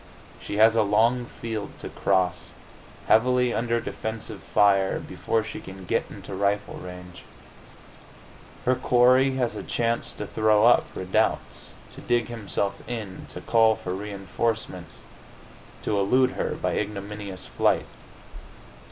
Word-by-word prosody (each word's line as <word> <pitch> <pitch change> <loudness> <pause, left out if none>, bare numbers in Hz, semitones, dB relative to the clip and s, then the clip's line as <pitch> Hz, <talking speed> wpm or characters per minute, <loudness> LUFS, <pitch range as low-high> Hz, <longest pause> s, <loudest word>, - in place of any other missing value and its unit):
She 100 - -5
has 110 +1 +6
a 115 - +4
long 115 +4 +3
field 110 -3 -6
to - - -7
cross, 90 -2 0 0.5
heavily 125 +1 +4
under 115 0 0
defensive 110 -3 -5
fire, 100 +1 +3
before 115 -1 -1
she 110 - -7
can 95 0 -10
get - - 0
into - - -9
rifle 100 +1 0
range. 90 -1 -9 1.4
Her 130 - +4
quarry 130 +1 +4
has 125 -3 0
a - - -4
chance 115 0 -1
to 105 - -5
throw 110 +1 +3
up 120 - +5
redoubts, 95 0 -1 0.2
to - - -11
dig 120 -1 +1
himself 100 -3 -3
in, 110 -6 -6
to - - -8
call 115 -1 +4
for 90 - -5
reinforcements, 100 -2 -4 0.8
to 105 - 0
elude 130 +6 +3
her - - -2
by - - -1
ignominious 100 -2 -5
flight. - - +1
110 Hz, 130 wpm, -25 LUFS, 100-115 Hz, 1.4 s, has